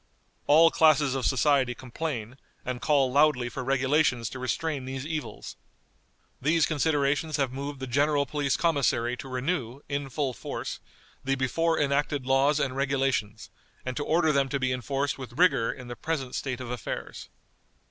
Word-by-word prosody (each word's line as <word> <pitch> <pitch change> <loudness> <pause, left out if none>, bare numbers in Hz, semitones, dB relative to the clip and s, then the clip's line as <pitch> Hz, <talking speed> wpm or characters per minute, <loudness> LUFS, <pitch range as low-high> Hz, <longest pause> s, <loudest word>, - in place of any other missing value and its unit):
All 160 +3 +7
classes 150 -4 +4
of 135 -3 0
society 135 -2 +2
complain, 130 -2 -5 0.3
and 125 -1 -4
call 140 -3 +3
loudly 140 -3 +3
for 130 +2 -5
regulations 130 -2 +1
to 130 - -7
restrain 135 +2 -2
these 135 +1 -5
evils. 155 -1 -5 0.8
These 155 +3 +3
considerations 150 0 0
have 135 -3 0
moved 140 +1 -5
the 130 - -4
General 140 +3 +2
Police 140 0 -1
Commissary 135 -7 +1
to 135 - -8
renew, 130 -1 -2
in 140 -1 -3
full 135 -1 -2
force, - - -5 0.4
the 135 0 +1
before 160 +6 0
enacted 145 -1 0
laws 135 +3 +3
and 130 -3 -1
regulations, 135 -6 -1 0.3
and 130 0 -3
to 145 - -2
order 160 +1 +2
them 140 -2 +1
to 140 - -1
be 130 -1 0
enforced 135 +3 -2
with 125 -1 -9
rigor 175 -10 +4
in 125 -2 -10
the 120 - -6
present 135 0 -3
state 130 -2 -3
of 125 -1 -6
affairs." 125 -3 -6
135 Hz, 160 wpm, -27 LUFS, 130-150 Hz, 0.8 s, All